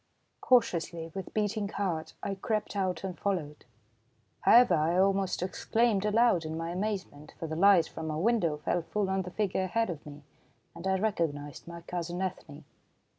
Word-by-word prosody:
Cautiously, 170 -9 +1
with 190 -2 -6
beating 210 -1 -1
heart, 175 -7 -3
I 200 - -2
crept 210 +1 -2
out 185 -4 -1
and 190 -2 -4
followed. 165 -7 -3 0.7
However, 240 -5 +6
I 165 +2 +2
almost 195 -1 +2
exclaimed 210 +2 +1
aloud 210 -4 +3
in 160 0 -4
my 165 +1 -3
amazement, 185 -6 -4
for - - -5
the 160 0 -4
light 190 -1 +5
from 160 -1 -6
a 155 - -2
window 175 -5 +1
fell 170 +3 -1
full 195 +3 -2
on 190 0 +1
the 180 - -6
figure 190 -1 -1
ahead 225 +2 0
of 155 -4 -8
me, 145 0 -11 0.5
and 170 +3 -6
I 190 0 +2
recognised 165 -9 -2
my 170 0 -8
cousin 175 +1 -4
Ethne. 180 -6 -5
185 Hz, 170 wpm, -30 LUFS, 165-200 Hz, 0.7 s, However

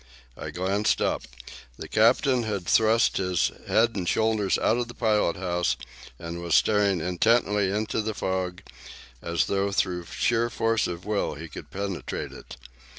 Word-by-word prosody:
I - - -6
glanced 100 +4 0
up. - - 0 0.6
The - - -7
captain 125 +3 +3
had 105 -5 -3
thrust 110 +4 +3
his 90 -3 +1 0.2
head 115 +1 +3
and 90 -3 -1
shoulders 110 -3 +1
out - - +2
of 120 -1 -2
the 120 - -11
pilot 105 -7 +1
house, 90 -1 -1 0.4
and 85 +3 -6
was 85 -2 +1
staring 100 -3 +3
intently 105 +3 +2
into 105 +2 -1
the 110 0 -3
fog 95 0 -3 0.6
as 85 0 0
though 100 0 0
by 90 -2 0
sheer 120 0 +1
force 115 -1 +1
of 85 0 -6
will 105 -1 -1
he 80 +3 -8
could - - -10
penetrate 100 -2 -4
it. - - -11
100 Hz, 155 wpm, -26 LUFS, 90-110 Hz, 0.6 s, captain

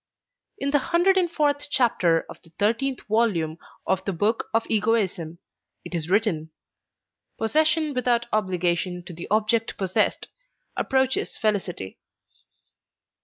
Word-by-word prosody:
In 280 -7 -1
the 290 - +4
hundred 345 +6 +3
and 355 -3 +2
fourth 290 -2 +1
chapter 180 - +2
of - - -11
the 165 - -15
thirteenth 235 +6 0
volume 190 -8 +1 0.3
of 190 0 0
the 195 - -2
Book 205 +6 0
of 225 0 +1
Egoism 200 -7 0 0.5
it - - -8
is 165 -1 -3
written: 185 -6 +1 0.9
Possession 310 +5 +2
without 245 -2 +1
obligation 180 -3 0
to 175 - -8
the 170 +1 -7
object 220 +2 +1
possessed 190 -2 0 0.5
approaches 265 0 0
felicity. 195 - -2
215 Hz, 120 wpm, -25 LUFS, 180-265 Hz, 0.9 s, the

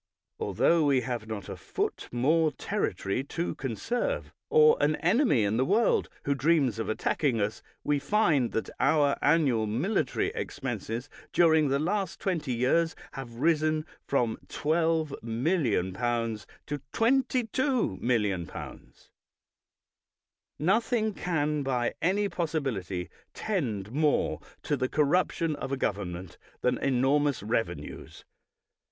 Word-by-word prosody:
Altho 170 -1 +2
we 140 -3 +3
have 120 -3 -4
not 110 -2 -5
a - - -5
foot - - -3
more 155 +6 +2
territory 100 -2 -2
to 170 +4 -3
conserve, 235 - -2 0.2
or 460 0 +6
an 150 +1 +3
enemy 180 - +3
in 105 +2 +1
the 130 - +3
world 215 - +2
who 140 - +1
dreams 140 -5 +2
of 115 - -2
attacking 120 +2 0
us, 105 +2 -2 0.2
we 145 -1 +1
find 145 - +2
that 110 - -2
our 145 -3 +3
annual 140 -8 +3
military 145 - 0
expenses 115 +4 -4 0.2
during 160 -3 +4
the 135 0 +2
last 190 +4 -1
twenty 165 -9 -1
years 130 +8 +2 0.2
have 125 -3 -8
risen 155 +2 +1 0.2
from 120 -5 0
12,000,000L 120 - 0 0.2
to 145 0 -4
22,000,d00Z. 225 - 0 1.7
Nothing 220 - +1
can 150 -5 -1
by 125 -3 0
any 200 +4 +2
possibility 135 - -2 0.3
tend 115 - -2
more 150 +2 +1 0.2
to 145 - 0
the 130 -2 -1
corruption 160 +1 +1
of 135 -1 -5
a 135 - 0
government 95 -6 -3 0.2
than 125 - +1
enormous 135 0 +2
revenues. 115 +1 -4
145 Hz, 115 wpm, -28 LUFS, 120-170 Hz, 1.7 s, or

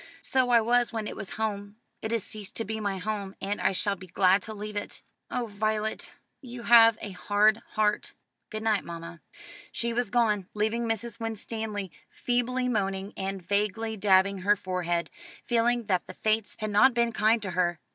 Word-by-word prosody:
"So 260 -4 +2
I 235 -1 +6
was 240 +1 +2
when 225 -2 -3
it - - -5
was 195 - -6
home. 205 -2 -3 0.3
It 220 - -3
has 230 -3 0
ceased 210 -3 -8
to 225 - -2
be 220 +1 -3
my 200 -2 -2
home, 200 0 -4
and 200 +1 -2
I - - +3
shall 200 +2 0
be 185 - -12
glad 185 +2 +3
to 220 - -7
leave 210 0 -6
it." 205 - -5 0.3
"Oh, 250 -1 -1
Violet, 215 0 -2 0.3
you 245 -3 -9
have 230 -2 +7
a 205 - -5
hard 205 +3 +3 0.2
heart." 210 -1 +1 0.4
"Good 215 -1 -5
night, 215 -3 +2
mamma." 170 0 -8 0.5
She 235 0 -2
was 240 -2 0
gone, 210 -4 +1
leaving 225 +2 0
Mrs. 225 0 -3
Winstanley 220 -3 -4 0.2
feebly 250 +1 -1
moaning, 195 -3 -1
and 195 -1 -4
vaguely 210 +2 0
dabbing 195 -1 +3
her 200 +3 +3
forehead, 180 -3 -2 0.3
feeling 240 0 +2
that 185 -3 0
the 185 - -9
Fates 215 0 0
had 215 -1 -3
not 245 +5 +5
been 235 0 +2
kind 220 +2 +3
to 190 - -3
her. 175 -1 +1
215 Hz, 185 wpm, -28 LUFS, 195-230 Hz, 0.5 s, have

